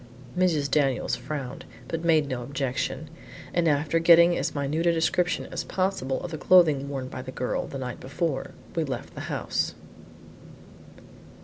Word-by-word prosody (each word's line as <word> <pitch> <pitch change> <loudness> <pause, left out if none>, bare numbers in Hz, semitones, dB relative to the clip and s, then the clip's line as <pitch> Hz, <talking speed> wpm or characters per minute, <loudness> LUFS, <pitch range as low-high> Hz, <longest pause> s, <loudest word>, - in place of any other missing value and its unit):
Mrs. 165 -6 +2
Daniels 135 -4 +2
frowned, 140 -5 -5 0.2
but 165 0 -3
made 160 -3 +4
no 130 -3 -3
objection, 135 +4 -3 0.5
and 170 -1 +2
after 150 +2 +2
getting 170 +1 +7
as - - -2
minute 150 +4 0
a - - +6
description 170 +2 +1
as - - -3
possible 185 -9 -1
of 175 - -5
the 155 - -5
clothing 155 -7 +5
worn 135 -2 -4
by 130 - -6
the 130 0 -7
girl 125 - -2
the 135 - -6
night 125 -2 -5
before, 140 +1 -2 0.3
we 165 - +1
left 135 -4 -5
the - - -7
house. - - -1
150 Hz, 155 wpm, -26 LUFS, 135-170 Hz, 0.5 s, getting